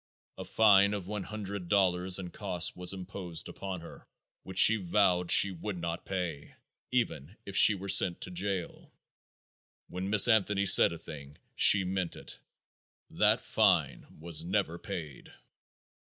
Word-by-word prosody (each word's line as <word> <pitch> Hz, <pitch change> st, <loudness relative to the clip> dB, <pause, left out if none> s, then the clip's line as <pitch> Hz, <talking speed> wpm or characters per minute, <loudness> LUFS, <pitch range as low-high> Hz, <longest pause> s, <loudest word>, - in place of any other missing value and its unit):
A -, -, -6 dB
fine 100 Hz, -2 st, +3 dB
of 100 Hz, -3 st, -7 dB
one 105 Hz, +1 st, -6 dB
hundred 100 Hz, -2 st, -8 dB
dollars 95 Hz, -2 st, +1 dB
and 90 Hz, -3 st, -9 dB
costs 95 Hz, -5 st, -2 dB
was 90 Hz, 0 st, -4 dB
imposed 95 Hz, -3 st, -7 dB
upon 95 Hz, -3 st, -8 dB
her, 85 Hz, -, -15 dB, 0.3 s
which 95 Hz, -1 st, -10 dB
she 110 Hz, +3 st, +7 dB
vowed 90 Hz, -2 st, 0 dB
she 100 Hz, -, +7 dB
would 95 Hz, +2 st, -7 dB
not 85 Hz, 0 st, -7 dB
pay, 90 Hz, -6 st, -6 dB, 0.4 s
even 110 Hz, -, -4 dB
if 100 Hz, -, -9 dB
she 105 Hz, -, +7 dB
were 100 Hz, 0 st, -9 dB
sent 95 Hz, -2 st, +4 dB
to 90 Hz, -, -6 dB
jail. 95 Hz, 0 st, -5 dB, 1.0 s
When 95 Hz, +2 st, -6 dB
Miss 105 Hz, +1 st, +5 dB
Anthony 105 Hz, -3 st, +1 dB
said 90 Hz, -, +6 dB
a 85 Hz, -, -8 dB
thing 75 Hz, -3 st, -12 dB, 0.2 s
she 100 Hz, -1 st, +5 dB
meant 95 Hz, -2 st, -4 dB
it. -, -, -11 dB, 0.7 s
That -, -, +1 dB
fine -, -, -1 dB
was 85 Hz, 0 st, -3 dB
never 90 Hz, -2 st, -3 dB
paid. 85 Hz, -, -9 dB
95 Hz, 150 wpm, -28 LUFS, 85-100 Hz, 1.0 s, she